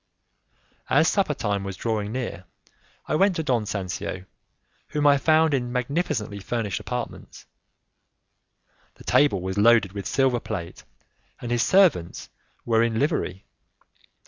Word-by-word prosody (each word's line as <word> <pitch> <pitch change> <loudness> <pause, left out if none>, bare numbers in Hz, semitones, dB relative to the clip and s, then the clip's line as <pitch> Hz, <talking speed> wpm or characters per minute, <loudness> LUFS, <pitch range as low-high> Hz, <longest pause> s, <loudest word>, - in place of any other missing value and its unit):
As - - +4
supper - - +1
time 100 -1 -2
was 95 -1 -6
drawing 110 -3 -2
near, 115 -7 -5 0.6
I - - -2
went 190 +4 +3
to 160 - -2
Don 125 -7 0
Sancio, 95 -1 -4 0.6
whom 150 -1 -2
I 140 -1 +5
found 160 +1 +3
in 125 -3 -1
magnificently 125 -5 -2
furnished 105 0 -3
apartments. 125 -2 -6 1.5
The - - -15
table 140 -11 +3
was 95 +2 -2
loaded 115 -3 +5
with 100 -1 -5
silver 130 0 +2
plate, 90 -8 -6 0.6
and 120 - -6
his 120 -1 +2
servants 170 - +2 0.4
were 115 -1 +3
in 115 -1 +1
livery. 115 - -1
115 Hz, 130 wpm, -24 LUFS, 100-140 Hz, 1.5 s, I